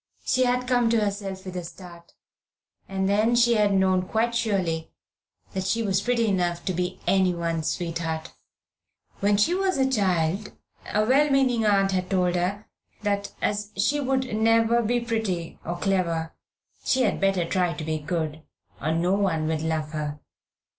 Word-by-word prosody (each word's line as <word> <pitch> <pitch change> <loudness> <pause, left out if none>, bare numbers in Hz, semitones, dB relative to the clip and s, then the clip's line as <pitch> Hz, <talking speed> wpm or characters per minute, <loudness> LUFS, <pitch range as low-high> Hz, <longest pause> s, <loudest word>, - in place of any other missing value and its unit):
She 255 0 +2
had 250 0 0
come 245 -2 +3
to 230 0 +3
herself 200 -2 -3
with 185 -1 -7
a 180 - -3
start, 170 0 -12 0.8
and 190 0 -1
then 215 +4 +3
she 240 0 +4
had 210 -2 +3
known 190 -1 +3
quite 230 +2 0
surely 190 -8 -1 0.6
that 190 -2 -2
she 225 +5 0
was 195 -2 +1
pretty 240 0 +1
enough 175 -4 0
to 185 - 0
be 180 +1 -3
anyone's 170 -4 +1
sweetheart. 165 -1 -3 0.9
When 205 0 +2
she 310 +12 +3
was 380 -2 +1
a 265 -1 +3
child 195 -5 0 0.4
a 210 0 +2
well 280 +5 +4
meaning 255 -5 +2
aunt 195 -1 +3
had 185 -1 -1
told 180 -2 +2
her 185 +4 -1 0.4
that 200 -1 -1
as 210 0 -1
she 275 +9 +2
would 260 -4 -1
never 225 +1 +3
be 240 +2 +1
pretty 220 -8 -3
or 175 +1 -4
clever 170 -4 -1 0.5
she 260 0 +2
had - - 0
better 195 -3 +2
try 180 0 0
to 160 - -6
be 155 0 -2
good, 155 0 -3 0.4
or 155 - 0
no 175 +3 +1
one 185 -6 +1
would 155 -1 -1
love 160 -1 -2
her. 150 -1 -4
195 Hz, 165 wpm, -25 LUFS, 170-225 Hz, 0.9 s, she